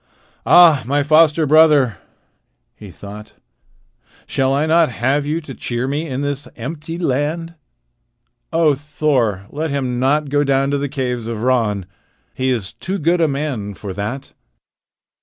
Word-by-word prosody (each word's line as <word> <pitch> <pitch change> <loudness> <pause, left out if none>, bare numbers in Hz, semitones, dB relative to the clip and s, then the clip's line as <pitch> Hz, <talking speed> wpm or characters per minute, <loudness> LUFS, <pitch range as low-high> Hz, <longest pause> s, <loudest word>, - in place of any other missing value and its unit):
"Ah, 165 -6 +7
my 145 +2 +1
foster 155 +1 +4
brother," 150 - +4 0.8
he - - -12
thought, 105 +1 -11 0.9
"shall 135 0 0
I 140 +3 +1
not 160 0 +3
have 135 +5 -1
you 155 +2 -1
to 145 -4 -9
cheer 120 +1 -3
me 150 +4 -2
in 135 -1 -3
this 145 0 -3
empty 150 +6 -6
land? 165 +2 -2 1.0
O 160 -2 +3
Thor, 140 -8 -1
let 155 +2 -3
him 130 -3 -2
not 145 +3 +1
go 145 +1 +2
down 135 0 +1
to 140 - 0
the 140 0 -3
caves 125 -4 -3
of 115 -1 -4
Ran! 110 -7 +1 0.5
He 130 0 -1
is 115 -7 -2
too 190 +2 -4
good 170 +1 +1
a 160 - +4
man 135 -8 -3
for 100 -1 -7
that." 105 +8 -5
140 Hz, 150 wpm, -18 LUFS, 125-155 Hz, 1.0 s, Ah